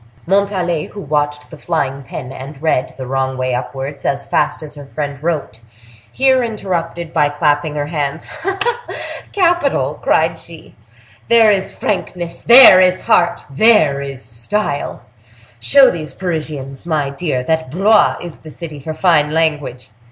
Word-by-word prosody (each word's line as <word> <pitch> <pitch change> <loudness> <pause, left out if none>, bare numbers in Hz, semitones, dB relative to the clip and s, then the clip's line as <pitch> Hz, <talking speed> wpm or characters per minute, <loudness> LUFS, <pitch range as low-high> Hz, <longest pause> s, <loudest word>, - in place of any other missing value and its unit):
Montalais, 185 -4 0
who 205 - -9
watched 145 0 -2
the 160 - -11
flying 140 -5 -2
pen, 125 0 -8
and 135 +2 -9
read, 150 -4 -1
the 130 - -6
wrong 130 0 -2
way 130 0 -1
upwards, 135 +3 -5
as 140 0 -1
fast - - -1
as 150 -1 -8
her 145 -2 -10
friend 140 -1 -5
wrote, 155 -9 -3 0.5
here 260 -1 +3
interrupted 175 -7 -4
by 145 - +2
clapping 145 0 0
her 145 -1 -2
hands. 150 0 -3 1.1
"Capital!" 335 - +1
cried 160 +1 +1
she; 165 -2 -12 0.5
"there 230 -2 +5
is 195 -2 -1
frankness—there 185 +3 +5
is 185 0 +2
heart—there 175 -2 +3
is 135 -2 -7
style! 145 - -3 0.6
Show 270 - +5
these 155 -5 -7
Parisians, 150 -7 -5
my 155 -5 -1
dear, 140 -4 -2
that 160 0 -1
Blois 200 +8 +3
is 175 -3 -8
the 155 - -12
city 155 -1 -8
for 155 +3 -6
fine 160 -3 +3
language!" 150 -7 -2
155 Hz, 140 wpm, -17 LUFS, 140-180 Hz, 1.1 s, there